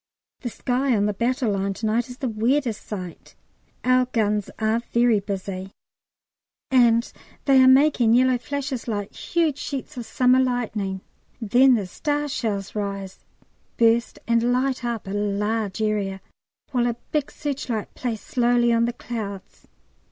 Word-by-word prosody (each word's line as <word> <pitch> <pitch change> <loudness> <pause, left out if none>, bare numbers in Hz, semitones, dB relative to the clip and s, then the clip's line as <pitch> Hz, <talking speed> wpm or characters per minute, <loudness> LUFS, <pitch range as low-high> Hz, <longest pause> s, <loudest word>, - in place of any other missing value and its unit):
The 245 - -4
sky 255 +2 0
on 205 - +2
the 210 - 0
battle 240 +2 0
line 195 0 -1
to 220 - -5
night 230 +3 0
is 250 - -9
the 265 - -2
weirdest 235 +1 0
sight; 185 -5 -7 0.5
our 255 0 +4
guns 210 -4 0
are 220 +1 +1
very 235 -2 +4
busy, 195 -1 -5 1.0
and 235 -2 +4 0.3
they 270 -2 +6
are 260 - +7
making 260 -4 +5
yellow 255 0 +3
flashes 270 +1 -4
like 205 -3 -3
huge 320 -4 -1
sheets 280 0 -5
of 235 -2 -5
summer 255 +2 +3
lightning. 220 -7 -1 0.4
Then 250 +4 +5
the 210 -4 -1
star 295 +10 -2
shells 210 -8 -3
rise, 200 -2 -4 0.6
burst, 230 +1 +3
and 235 +1 +2
light 255 +1 0
up 235 -2 -3
a 195 - -6
large 210 +1 -1
area, 200 -3 -1 0.5
while 245 -3 +1
a 235 - -1 0.2
big 300 -2 0
searchlight 260 -7 -4
plays 230 -4 -4
slowly 240 -1 +2
on 230 0 +3
the 240 - -2
clouds. 205 -6 -7
235 Hz, 150 wpm, -23 LUFS, 210-255 Hz, 1.0 s, are